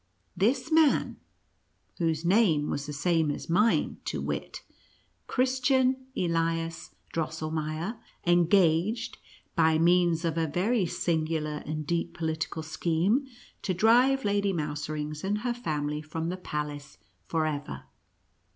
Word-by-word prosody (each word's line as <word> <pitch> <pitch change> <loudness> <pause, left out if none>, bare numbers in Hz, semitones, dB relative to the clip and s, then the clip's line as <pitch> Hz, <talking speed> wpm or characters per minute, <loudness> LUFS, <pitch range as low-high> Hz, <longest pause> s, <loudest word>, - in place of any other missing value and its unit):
This 250 - +1
man 315 -2 +3 0.8
(whose 165 -1 0
name 175 -6 +3
was 145 0 -3
the - - -4
same 160 +1 +1
as 145 - -4
mine, 210 +6 +2
to - - -2
wit, - - -4 0.6
Christian 260 0 +2
Elias 165 -1 -1 0.2
Drosselmeier) 160 +4 -3 0.3
engaged, 175 +5 +3 0.4
by 160 -2 +4
means 170 0 +3
of 165 0 0
a 160 - +1
very 190 +6 +1
singular 155 -2 -1
and 155 0 -3
deep 170 +2 -2
political 160 -1 -2
scheme, 175 - 0 0.3
to 185 - -1
drive 245 +6 +4
Lady 200 -1 +1
Mouserings 150 -1 -3
and 205 +2 -1
her 245 +1 0
family 150 -9 -2
from 160 +2 -4
the 185 - -3
palace 150 -4 -5 0.3
forever. 155 -3 -2
165 Hz, 115 wpm, -28 LUFS, 155-205 Hz, 0.8 s, by